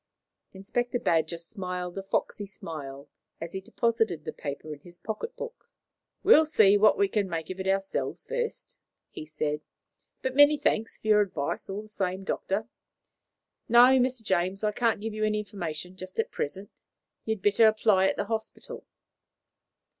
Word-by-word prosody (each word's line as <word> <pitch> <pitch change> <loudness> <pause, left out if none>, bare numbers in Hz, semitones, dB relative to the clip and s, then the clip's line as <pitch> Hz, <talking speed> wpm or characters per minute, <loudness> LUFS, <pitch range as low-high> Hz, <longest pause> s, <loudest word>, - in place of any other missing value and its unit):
Inspector 240 +6 -2
Badger 165 -7 +1
smiled 180 0 -5
a 195 - -3
foxy 200 +1 -2
smile 145 -7 -8 0.3
as 165 0 -6
he 190 - -4
deposited 220 -6 0
the - - -4
paper 145 +2 -6
in 145 - -11
his 175 +3 -15
pocket 220 - -5
book. - - -8 0.5
"We'll 320 -6 +7
see 210 -10 +5
what 210 +1 +5
we 200 - +3
can 200 -1 -1
make 165 0 -4
of 185 - -7
it 190 - -3
ourselves 195 0 -1
first," - - -4 0.3
he 155 - -8
said; 150 -1 -2 0.6
"but 260 0 -2
many 290 +1 +7
thanks 225 -6 0
for - - -24
your 210 -1 +6
advice, 185 -7 -3
all 200 +2 -4
the - - -14
same, 190 -2 -3
Doctor. 195 +2 -2 1.0
No, 250 +3 +7
Mr. 255 -2 0
James, 190 0 0
I 210 - +2
can't 225 -1 +1
give 220 0 -4
you 215 0 -2
any 215 0 +1
information 180 -4 -5
just 185 0 -8
at 225 - -1
present; 195 +7 -4 0.5
you 220 - 0
had 200 - -17
better 210 +2 +5
apply 215 -3 +4
at - - 0
the 205 - -2
hospital." 220 +1 -5
200 Hz, 170 wpm, -28 LUFS, 180-225 Hz, 1.0 s, We'll